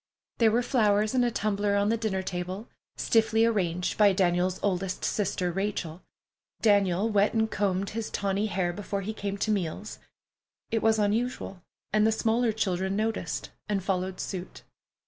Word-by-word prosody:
There 230 -2 +6
were 235 +3 +2
flowers 215 -4 +2
in 255 -1 +3
a 240 - +3
tumbler 205 -2 0
on 200 +1 +2
the 230 - +3
dinner 215 -4 -2
table, 185 +4 -4 0.3
stiffly 225 0 +3
arranged 180 -6 0
by 205 -2 +6
Daniel's 180 0 +1
oldest 190 -1 -1
sister, 185 -3 0
Rachel. 185 -3 -3 0.6
Daniel 200 -2 +3
wet 210 0 +2
and 220 0 +1
combed 195 -1 0
his 225 0 -4
tawny 200 +1 -1
hair 180 -3 -1
before 200 +1 -4
he 210 +3 -4
came 200 -2 -4
to 215 +2 0
meals. 200 +1 -3 0.7
It 225 - +1
was 220 0 +3
unusual, 210 -2 -1 0.3
and 215 0 +4
the - - +3
smaller 225 +2 +1
children 190 -2 -1
noticed 220 +2 -2 0.2
and 200 -3 0
followed 185 -1 -2
suit. 185 -1 -6
205 Hz, 160 wpm, -28 LUFS, 190-220 Hz, 0.7 s, There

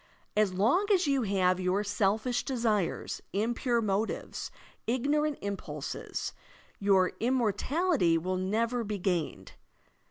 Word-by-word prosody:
As 210 -2 +3
long 230 - +2
as 380 -2 +4
you 275 -2 +2
have 185 -4 +2
your 185 +2 +1
selfish 210 +4 +1
desires, 225 -8 -1
impure 235 +3 +1
motives, 205 +2 -2 0.4
ignorant 290 +5 +1
impulses, 200 -1 -4 0.5
your 195 -2 +4
immortality 245 - +2
will 185 +3 -1
never 230 +6 0
be 210 -1 -3
gained. 180 -4 -2
215 Hz, 105 wpm, -30 LUFS, 195-250 Hz, 0.5 s, as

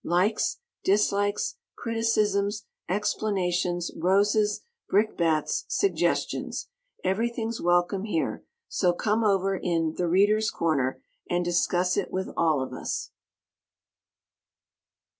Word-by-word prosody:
Likes, 205 - +1 0.3
dislikes, 205 - +1 0.2
criticisms, 210 -3 0 0.2
explanations, 180 -3 0
roses, 205 +4 +2 0.3
brickbats, 195 - +1
suggestions 395 - 0 0.3
everything's 225 +4 -1
welcome 175 +3 +2
here: 165 -7 -2 0.2
so 180 -2 +1
"come 215 +5 0
over 195 -2 +2
in 165 -3 0
'The 175 - -1
Readers' 205 +5 +3
Corner'" 140 -6 0 0.3
and 175 0 0
discuss 175 +1 +1
it - - -1
with 190 0 -2
all 155 -5 +2
of 130 - -7
us! - - -4
195 Hz, 95 wpm, -27 LUFS, 175-210 Hz, 0.3 s, Readers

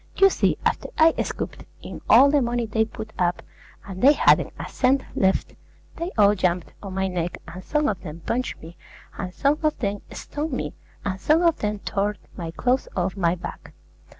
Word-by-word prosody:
You 390 0 +6
see, - - +1
after - - 0
I 320 +1 +6
scooped - - -5 0.2
in - - -8
all 280 +1 +8
the 290 -1 +4
money 240 -1 0
they 220 0 +1
put 220 -1 -9
up, 175 -1 +1 0.4
and 190 -2 -7
they 280 +3 +8
hadn't - - +4
a - - -5
cent 265 +1 +2
left, 190 0 +1 0.4
they 335 +2 -3
all 205 -1 +6
jumped 180 -3 -1
on 195 -2 -7
my 190 0 0
neck, 175 -2 -3
and 180 +2 -9
some 300 -1 +1
of 195 -4 -2
them 165 -1 -8
punched 255 +2 -2
me, 165 +2 -11 0.4
and 185 -2 -3
some 280 +9 +1
of 310 -1 +1
them 200 -3 -2
stoned 300 0 -5
me, - - -3 0.3
and 190 -1 -3
some 320 +3 +3
of 335 -2 +3
them 210 0 -1
tore 205 +1 0 0.2
my 170 -3 -5
clothes 250 +9 0
off 185 +1 -1
my 175 -3 +1
back. 180 - -9
210 Hz, 195 wpm, -24 LUFS, 185-275 Hz, 0.4 s, all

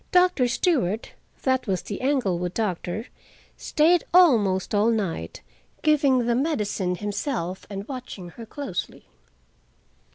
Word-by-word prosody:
Doctor 360 -8 +4
Stewart—that 260 - -1
was 190 -2 -1
the 205 - -6
Englewood 190 -11 0
doctor—stayed 225 - -1
almost 220 - +4
all 210 +2 +3
night, 190 - -2 0.4
giving 280 -5 +3
the 240 - +2
medicine 215 - 0
himself, 205 - -3
and 200 0 -6
watching 250 -9 -7
her 230 +5 -11
closely. 220 -8 -5
225 Hz, 100 wpm, -25 LUFS, 190-275 Hz, 0.4 s, Doctor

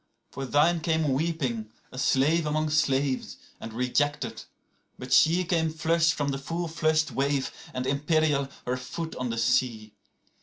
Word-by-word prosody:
85For 135 -1 -5
thine 165 +4 +3
came 160 -3 +1
weeping, 130 -8 -2 0.2
a 130 - -7
slave 150 +4 +2
among 155 0 0
slaves, 140 -3 0 0.2
and 115 - -7
rejected; 125 +5 -1 0.5
but - - -8
she86Came 165 -1 +3
flushed 165 +1 +2
from 145 -1 -1
the 135 0 -2
full 165 +5 -3
flushed 155 -1 +1
wave, 140 0 0 0.2
and 125 0 -3
imperial, 140 0 +1 0.2
her 125 +1 -1
foot 145 +6 -6
on 125 -1 -2
the 115 - -3
sea. 115 -3 0
145 Hz, 145 wpm, -27 LUFS, 130-160 Hz, 0.5 s, thine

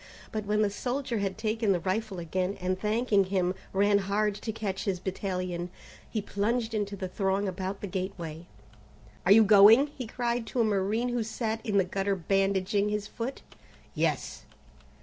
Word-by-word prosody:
But 215 -1 -3
when 210 +1 +2
the 205 - +1
soldier 245 +2 -2
had 195 -1 -2
taken 220 -1 +1
the 180 - 0
rifle 195 +3 -2
again, 180 +3 -2
and 185 0 -1
thanking 215 -2 +2
him, 185 -1 0 0.2
ran 200 +1 +3
hard 205 +2 0
to 215 +2 -5
catch 205 -3 -4
his 190 -3 -1
battalion, 185 -2 -3 0.4
he 215 -3 -2
plunged 225 +3 -1
into 205 -2 -2
the 190 -1 -4
throng 195 +1 0
about 190 +1 -4
the - - -3
gateway. 175 -3 -5 0.8
"Are - - +5
you 220 +2 +9
going?" 215 +7 +7
he 255 -4 -5
cried 240 0 -2
to 245 - -3
a - - +5
marine 215 +3 +1
who 240 -1 0
sat 225 0 -3
in 205 -2 0
the 195 - +5
gutter 195 +2 -1
bandaging 195 +3 +1
his 210 -1 -2
foot. 240 +5 -5 0.5
"Yes." - - -1
200 Hz, 170 wpm, -29 LUFS, 190-220 Hz, 0.8 s, you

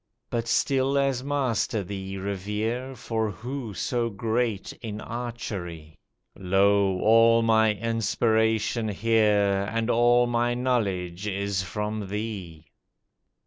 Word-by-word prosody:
But 115 -1 -2
still 135 +2 +2
as 135 -2 +1
Master 130 -6 0
thee 95 0 -6
revere, 105 +7 -3
For 110 -3 -2
who 120 0 -6
so 120 +6 -1
great 110 -1 -2
in 110 -2 -5
archery! 100 -10 -6 0.4
Lo, 95 0 +2
all 115 +1 +5
my 110 -1 +3
inspiration 110 +1 +1
here, 105 -2 +2
And 115 +1 0
all 120 +1 +4
my 120 0 0
knowledge 100 -7 -1
is 100 -1 -1
from 105 +2 -4
thee." 95 -6 -5
110 Hz, 105 wpm, -26 LUFS, 100-120 Hz, 0.4 s, all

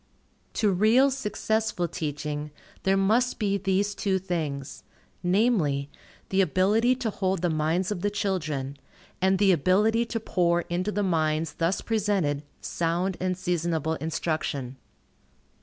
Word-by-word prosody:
To 210 -3 +2
real, 225 +9 +4
successful 220 -6 -1
teaching, 150 -2 -4 0.3
there 195 0 +2
must 225 +6 +2
be 200 -2 0
these 195 +1 +1
two 195 -1 0
things, 155 -7 -4 0.4
namely, 175 - +1 0.4
the 195 0 +3
ability 205 +8 +3
to 240 -4 -2
hold 190 -3 -1
the 175 - +2
minds 160 +5 0
of 190 -4 -3
the 205 - +1
children, 155 -10 -2 0.4
and 190 +1 +3
the 200 0 +4
ability 210 +8 +3
to 230 0 -3
pour 175 -5 +1
into 180 +4 -2
the 205 0 -1
minds 160 -3 0
thus 165 +4 0
presented 200 -10 0 0.2
sound 175 +3 -1
and 185 -1 -1
seasonable 170 -3 -1
instruction. 155 -5 -3
185 Hz, 130 wpm, -26 LUFS, 160-205 Hz, 0.4 s, real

